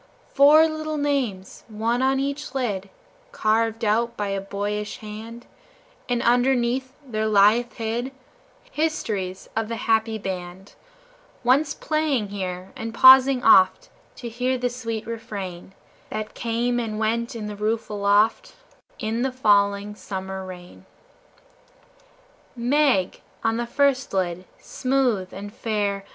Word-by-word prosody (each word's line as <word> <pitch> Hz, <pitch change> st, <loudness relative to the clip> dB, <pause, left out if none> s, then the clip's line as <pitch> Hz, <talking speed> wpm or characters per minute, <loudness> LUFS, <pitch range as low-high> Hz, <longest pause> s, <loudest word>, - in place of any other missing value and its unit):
Four 300 Hz, +3 st, +7 dB
little 310 Hz, -1 st, -4 dB
names, 265 Hz, -10 st, -2 dB
one 230 Hz, +3 st, -1 dB
on 265 Hz, 0 st, +2 dB
each 280 Hz, 0 st, -4 dB
lid, 200 Hz, -7 st, -2 dB, 0.4 s
Carved 225 Hz, -, 0 dB
out 235 Hz, +3 st, +1 dB
by 205 Hz, -1 st, -2 dB
a 195 Hz, 0 st, -2 dB
boyish 205 Hz, +1 st, -4 dB
hand, 225 Hz, +3 st, -9 dB, 0.6 s
And 245 Hz, -1 st, 0 dB
underneath 245 Hz, +1 st, +2 dB
there 220 Hz, -4 st, -2 dB
lieth 215 Hz, +3 st, +4 dB
hid 235 Hz, +3 st, -3 dB, 0.6 s
Histories 210 Hz, -, -2 dB
of 225 Hz, 0 st, -1 dB
the 230 Hz, -, -4 dB
happy 225 Hz, 0 st, +1 dB
band 190 Hz, -1 st, -7 dB, 0.7 s
Once 275 Hz, +5 st, +2 dB
playing 300 Hz, -9 st, -1 dB
here, 185 Hz, -2 st, -5 dB
and 225 Hz, 0 st, -6 dB
pausing 260 Hz, 0 st, +7 dB
oft 185 Hz, 0 st, +5 dB, 0.3 s
To 240 Hz, -, -7 dB
hear 250 Hz, +3 st, -1 dB
the 245 Hz, 0 st, -1 dB
sweet 230 Hz, -3 st, -5 dB
refrain, 195 Hz, -5 st, -7 dB, 0.3 s
That 215 Hz, 0 st, -5 dB
came 240 Hz, +1 st, -1 dB
and 220 Hz, -3 st, -3 dB
went 230 Hz, +2 st, -1 dB
on 220 Hz, -2 st, -5 dB
the 210 Hz, 0 st, -5 dB
roof 215 Hz, +2 st, -1 dB
aloft, 210 Hz, -, +1 dB, 0.4 s
In 225 Hz, +2 st, -2 dB
the 265 Hz, +1 st, 0 dB
falling 205 Hz, -4 st, +2 dB
summer 190 Hz, -2 st, -6 dB
rain. 180 Hz, -1 st, -11 dB, 1.7 s
"Meg" 245 Hz, -5 st, +1 dB, 0.2 s
on 225 Hz, 0 st, +1 dB
the 240 Hz, 0 st, -2 dB
first 275 Hz, +1 st, +1 dB
lid, 180 Hz, -1 st, -1 dB
smooth 255 Hz, -8 st, -1 dB
and 205 Hz, +2 st, -8 dB
fair. 205 Hz, -4 st, -2 dB
225 Hz, 125 wpm, -23 LUFS, 205-255 Hz, 1.7 s, Four